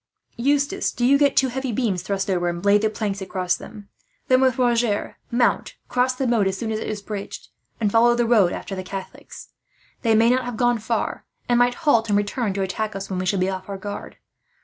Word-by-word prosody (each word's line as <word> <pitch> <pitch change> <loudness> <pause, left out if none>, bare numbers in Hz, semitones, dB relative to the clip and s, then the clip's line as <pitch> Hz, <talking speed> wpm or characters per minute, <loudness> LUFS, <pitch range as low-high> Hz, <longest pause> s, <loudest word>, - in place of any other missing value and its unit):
"Eustace, 285 +8 +1
do 245 - -1
you 270 +3 +5
get 280 -1 +3
two 265 - +4
heavy 265 0 -3
beams 210 -6 -1
thrust 195 +1 -2
over, 175 -2 0
and 175 +2 -5
lay 205 +1 +5
the 215 +1 +1
planks 205 -2 -3
across 185 -1 -1
them; 210 -2 -11 0.4
then 255 0 +5
with 260 -2 +3
Roger 235 -4 0
mount, 240 0 +1
cross 255 +1 +1
the 265 - -2
moat 230 -5 +2
as 190 0 -2
soon 220 +2 -3
as 215 - -2
it - - -5
is 210 -2 -4
bridged, 205 -2 -7 0.3
and 210 -3 +1
follow 235 +2 +5
the 240 0 +1
road 215 -7 +4
after - - -6
the 185 - -4
Catholics. 190 +1 -9 0.5
They 225 -3 +3
may 230 +2 +5
not 255 0 +1
have 245 -2 -5
gone 240 0 +2
far, 225 +2 -2 0.2
and 240 0 +3
might 245 0 +3
halt 230 -7 +3
and 205 - +3
return 205 +2 -1
to 195 0 -1
attack 215 +2 -3
us, 195 0 -6
when 185 - -2
we 185 - -2
shall 195 - +1
be 185 +1 +1
off 185 +1 -6
our 200 - -4
guard. 205 +1 -7
220 Hz, 230 wpm, -23 LUFS, 195-245 Hz, 0.5 s, you